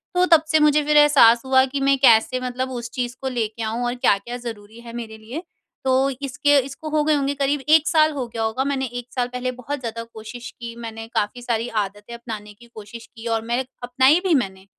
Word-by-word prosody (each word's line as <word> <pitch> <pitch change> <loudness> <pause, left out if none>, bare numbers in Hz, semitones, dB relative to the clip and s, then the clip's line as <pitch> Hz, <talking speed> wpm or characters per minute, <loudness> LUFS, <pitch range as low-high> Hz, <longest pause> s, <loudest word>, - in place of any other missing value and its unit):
तो 360 0 +4
तब 315 - +2
से 315 - +5
मुझे 300 0 +4
फिर 300 +1 +2
एहसास 275 -6 +6
हुआ 260 0 +4
कि 270 +1 -4
मैं 275 0 +3
कैसे 245 0 +5
मतलब 255 +1 -3
उस 240 -2 -5
चीज़ 245 -1 -3
को 265 - -3
लेके 220 +1 -3
आऊँ 225 +3 -2
और 240 0 -1
क्या-क्या 240 0 0
ज़रूरी 225 -2 -9
है 235 -1 -11
मेरे 225 -2 -7
लिए। 240 +11 -7 0.4
तो 265 +1 +3
इसके 285 +2 +2
इसको 280 +3 -8
हो 305 0 +1
गए 310 +1 +2
होंगे 280 -1 0
करीब 280 +1 0
1 315 0 +5
साल 310 -1 +4
हो 275 -4 -3
गया 230 -1 -6
होगा। 220 +4 -1
मैंने 275 -1 -1
1 245 0 -7
साल 250 -1 0
पहले 250 0 -2
बहुत 285 +4 -5
ज़्यादा 230 -2 -5
कोशिश 230 +3 -9
की 235 -1 -7
मैंने 225 0 -7
काफ़ी 210 +4 -1
सारी 235 -1 -1
आदतें 205 +3 -7
अपनाने 220 -3 -8
की 235 +3 -18
कोशिश 220 +2 -10
की 225 0 -11
और 225 - -1
मैं 240 +2 0 0.2
अपनाई 260 +6 +4
भी 365 - +3
मैंने 190 -7 -2
245 Hz, 225 wpm, -22 LUFS, 225-275 Hz, 0.4 s, एहसास